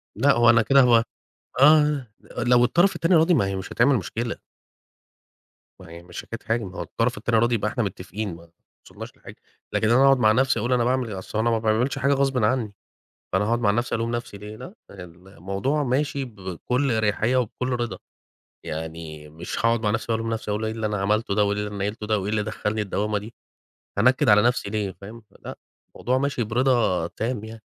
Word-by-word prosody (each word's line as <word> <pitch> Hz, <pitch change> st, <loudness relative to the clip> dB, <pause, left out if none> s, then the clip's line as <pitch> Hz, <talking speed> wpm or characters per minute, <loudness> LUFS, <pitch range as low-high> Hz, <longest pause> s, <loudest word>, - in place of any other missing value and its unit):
لأ، 140 Hz, -, +4 dB
هو 120 Hz, -1 st, +4 dB
أنا 120 Hz, -1 st, +6 dB
كده 135 Hz, +5 st, +5 dB
هو 120 Hz, -2 st, +5 dB, 0.6 s
آه، 150 Hz, -2 st, +5 dB, 0.3 s
لو 120 Hz, 0 st, +4 dB
الطرف 175 Hz, +9 st, +3 dB
التاني 170 Hz, +2 st, +1 dB
راضي، 165 Hz, +2 st, +5 dB
ما 100 Hz, -, +2 dB
هي 95 Hz, 0 st, -3 dB
مش 95 Hz, 0 st, -6 dB
هتعمل 130 Hz, +4 st, +3 dB
مشكلة. 115 Hz, +3 st, -4 dB, 1.5 s
ما 90 Hz, -, -13 dB
هي 85 Hz, +1 st, -11 dB
مش 90 Hz, 0 st, -8 dB
حكاية 115 Hz, -, -8 dB
حاجة، 115 Hz, +1 st, 0 dB
ما 95 Hz, -2 st, -8 dB
هو -, -, -3 dB
الطرف 115 Hz, 0 st, -2 dB
التاني 115 Hz, +2 st, 0 dB
راضي 120 Hz, +1 st, +2 dB
يبقى 105 Hz, -1 st, -1 dB
إحنا 120 Hz, -, -1 dB
متّفقين، 100 Hz, 0 st, -5 dB
ما 85 Hz, 0 st, -16 dB, 0.4 s
وصلناش -, -, -11 dB
لحاجة. -, -, -13 dB, 0.4 s
لكن 110 Hz, -, +1 dB
أنا 125 Hz, +3 st, +5 dB
أقعُد 135 Hz, 0 st, +6 dB
مع 110 Hz, -3 st, +5 dB
نَفْسي 130 Hz, +1 st, +2 dB
وأقول 120 Hz, +4 st, 0 dB
أنا 120 Hz, -1 st, +2 dB
باعمل 125 Hz, -1 st, 0 dB
أصل 105 Hz, +3 st, -5 dB
أنا 115 Hz, +2 st, +2 dB
ما 115 Hz, -1 st, +1 dB
باعملش 110 Hz, +5 st, 0 dB
حاجة 140 Hz, +2 st, +2 dB
غصبٍ 135 Hz, -3 st, +1 dB
عنّي، 110 Hz, -2 st, 0 dB, 0.6 s
فأنا 95 Hz, +2 st, +2 dB
هاقعُد 115 Hz, +2 st, +1 dB
مع 105 Hz, -4 st, +2 dB
نَفْسي 120 Hz, +4 st, -1 dB
ألوم 115 Hz, 0 st, -2 dB
نَفْسي 120 Hz, -4 st, -6 dB
ليه؟ 105 Hz, +1 st, -9 dB
لأ. 180 Hz, -, -10 dB, 0.2 s
الموضوع 95 Hz, -, -4 dB
ماشي 140 Hz, +1 st, -1 dB
بكل 115 Hz, +5 st, -3 dB
أريحيّة 110 Hz, +2 st, +1 dB
وبكل 125 Hz, +1 st, -2 dB
رضا، 120 Hz, -2 st, -2 dB, 0.7 s
يعني 80 Hz, -1 st, -7 dB
مش 80 Hz, +3 st, -7 dB
هاقعُد 115 Hz, 0 st, +2 dB
مع 105 Hz, -, 0 dB
نَفْسي 115 Hz, +1 st, -2 dB
وألوم 115 Hz, 0 st, -1 dB
نَفْسي، 110 Hz, -1 st, -4 dB
أقول 105 Hz, +2 st, -2 dB
إيه 110 Hz, -, -2 dB
اللي 110 Hz, 0 st, -4 dB
أنا 105 Hz, -2 st, -2 dB
عملته 105 Hz, +1 st, 0 dB
ده 105 Hz, -, +3 dB
وإيه 100 Hz, 0 st, 0 dB
اللي 105 Hz, 0 st, -7 dB
نيّلته 105 Hz, +2 st, -4 dB
ده 110 Hz, -1 st, +1 dB
وإيه 100 Hz, +1 st, -4 dB
اللي 110 Hz, -1 st, 0 dB
دخّلني 110 Hz, 0 st, -3 dB
الدوّامة 105 Hz, +1 st, -1 dB
دي؟ 105 Hz, +3 st, -8 dB, 0.6 s
هانكِّد 130 Hz, +5 st, +3 dB
على 105 Hz, 0 st, +6 dB
نَفْسي 120 Hz, -3 st, +1 dB
ليه 105 Hz, -2 st, -2 dB
فاهم؟ 110 Hz, +4 st, -10 dB
فلأ، 105 Hz, -, -11 dB, 0.4 s
الموضوع 125 Hz, +1 st, 0 dB
ماشي 140 Hz, -2 st, -1 dB
برضا 115 Hz, -6 st, +1 dB
تام 115 Hz, +3 st, -4 dB
يعني. 110 Hz, 0 st, -10 dB
115 Hz, 200 wpm, -24 LUFS, 105-125 Hz, 1.5 s, أنا